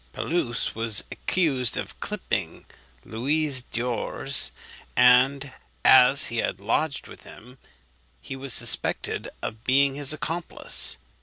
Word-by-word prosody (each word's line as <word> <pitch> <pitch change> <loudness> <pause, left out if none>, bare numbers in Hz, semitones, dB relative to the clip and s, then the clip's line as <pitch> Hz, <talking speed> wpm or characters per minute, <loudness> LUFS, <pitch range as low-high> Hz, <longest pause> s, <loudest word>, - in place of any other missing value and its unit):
Pelouse 155 -9 -2
was 115 -2 +2
accused 135 -10 0
of - - -6
clipping - - -5 0.4
Louis 140 +3 0
d'ors; 120 -2 -1 0.5
and 130 +2 +3 0.3
as 130 +1 +6
he 115 - -4
had 100 - -2
lodged 140 +9 -2
with - - -14
him, 125 +3 -15 0.6
he 135 - -9
was 135 0 -3
suspected - - +1
of 110 0 -6
being 135 +1 +2
his 140 0 +2
accomplice. 165 +2 -1
130 Hz, 110 wpm, -24 LUFS, 120-140 Hz, 0.6 s, as